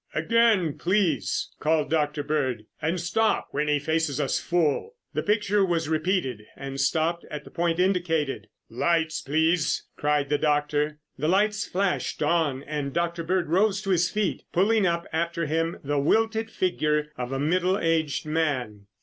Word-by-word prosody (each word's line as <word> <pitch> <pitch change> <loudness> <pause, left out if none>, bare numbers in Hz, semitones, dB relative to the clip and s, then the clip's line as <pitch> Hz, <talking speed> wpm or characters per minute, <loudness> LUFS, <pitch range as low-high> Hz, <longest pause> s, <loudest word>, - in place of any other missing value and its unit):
"Again, 225 -9 +2
please!" 185 -1 +1
called 155 0 +1
Dr. 150 -2 0
Bird. 130 -7 -1 0.2
"And 165 +4 0
stop 215 +6 +1
when 150 +2 -1
he 150 0 +3
faces 160 -1 -1
us 140 - 0
full." 175 - 0 0.2
The - - 0
picture 210 -1 +2
was 170 -4 0
repeated 155 - 0
and 135 0 -5
stopped 160 +4 +1
at 150 -1 -6
the - - -14
point 170 -1 0
indicated. 165 - 0 0.2
"Lights, 160 +5 0
please!" 160 +3 +1
cried 145 -1 +1
the 145 -1 +1
doctor. 150 0 +1 0.2
The 155 - 0
lights 210 +4 +2
flashed 190 -4 -1
on 150 -4 +1
and 145 -2 -4
Dr. 170 0 -1
Bird 175 -1 0
rose 195 +3 +3
to 195 - -1
his 175 -1 +3
feet, 210 -3 -1
pulling 205 +2 +3
up 170 0 -1
after 170 +1 -1
him 165 +2 -1
the 145 0 0
wilted 220 +8 +1
figure 150 -7 0
of 125 -1 -5
a 135 - -1
middle 180 +6 +1
aged 160 -5 0
man. 130 -10 -2
160 Hz, 160 wpm, -26 LUFS, 150-180 Hz, 0.2 s, he